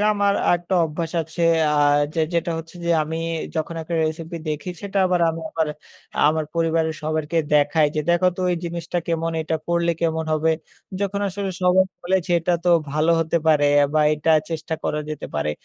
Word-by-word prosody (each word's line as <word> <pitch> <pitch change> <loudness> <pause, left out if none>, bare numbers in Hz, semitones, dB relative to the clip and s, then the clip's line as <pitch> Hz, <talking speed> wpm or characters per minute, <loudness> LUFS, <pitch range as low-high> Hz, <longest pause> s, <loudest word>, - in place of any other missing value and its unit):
আমার 200 -1 +2
আরেকটা 175 +2 +1
অভ্যাস 160 +2 -4
আছে। 160 +2 -5 0.3
আ - - +1 0.4
যে 165 - 0
যেটা 170 0 0
হচ্ছে 165 +2 -9
যে 170 - 0
আমি 160 +1 -4 0.4
যখন 160 +1 -2
একটা 170 +2 -5
রেসিপি 160 +2 -4
দেখি 155 +4 -3
সেটা 200 0 -2
আবার 180 -1 +1
আমি 165 0 -6
আবার 160 -1 0 0.6
আমার 155 0 0
পরিবারের 165 -1 +1
সবাইকে 155 +1 -1 0.2
দেখাই 150 +1 +4
যে, 155 - +1
"দেখো 175 +1 +4
তো - - -5
এই - - -1
জিনিসটা 170 +1 -3
কেমন? 165 0 0
এইটা 160 0 -1
করলে 170 0 +2
কেমন 160 -1 0
হবে?" 155 +1 +2 0.5
যখন 200 0 -1
আসলে 195 +1 -3
সবাই 180 +1 +5 0.2
বলেছে, 185 0 0
"এইটা 170 +2 0
তো 175 - +3 0.2
ভালো 155 +3 +1
হতে 165 +1 0
পারে 150 -2 +4
অ্যা 145 0 +5
বা 155 - +4
এটা 150 +2 0 0.2
চেষ্টা 160 0 -3
করা 150 - -1
যেতে 150 - -5
পারে।" 75 +1 0
165 Hz, 185 wpm, -22 LUFS, 155-175 Hz, 0.6 s, সবাই